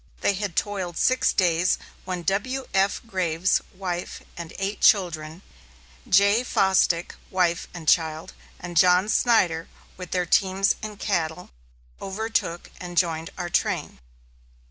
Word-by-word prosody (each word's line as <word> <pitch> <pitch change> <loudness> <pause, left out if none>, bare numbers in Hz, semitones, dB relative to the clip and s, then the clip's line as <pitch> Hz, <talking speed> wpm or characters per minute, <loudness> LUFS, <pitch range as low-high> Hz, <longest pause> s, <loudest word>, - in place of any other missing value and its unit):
They - - +2
had 195 -3 -4
toiled 190 -4 -2
six 255 0 +3
days, 175 -1 +2 0.3
when 180 -2 -4
W.F. 200 0 0
Graves, 185 -4 0
wife, 180 -2 -5
and 170 -1 -7
eight 195 +1 -3
children; 170 -3 +2 0.7
J. 200 +5 +4
Fosdick, 190 -6 +2 0.2
wife, 175 -2 0
and 165 -3 -10
child, 160 -1 +1 0.3
and 175 0 -8
John 180 +4 +5
Snyder, 180 -9 +2 0.3
with 180 -2 -8
their 180 -1 0
teams 190 +2 +2
and 215 -1 -7
cattle, 170 -4 -2 0.5
overtook 195 -4 -3
and 175 -1 -7
joined 165 -2 +1
our 175 -1 -4
train. 65 - -1
180 Hz, 120 wpm, -24 LUFS, 170-195 Hz, 0.7 s, John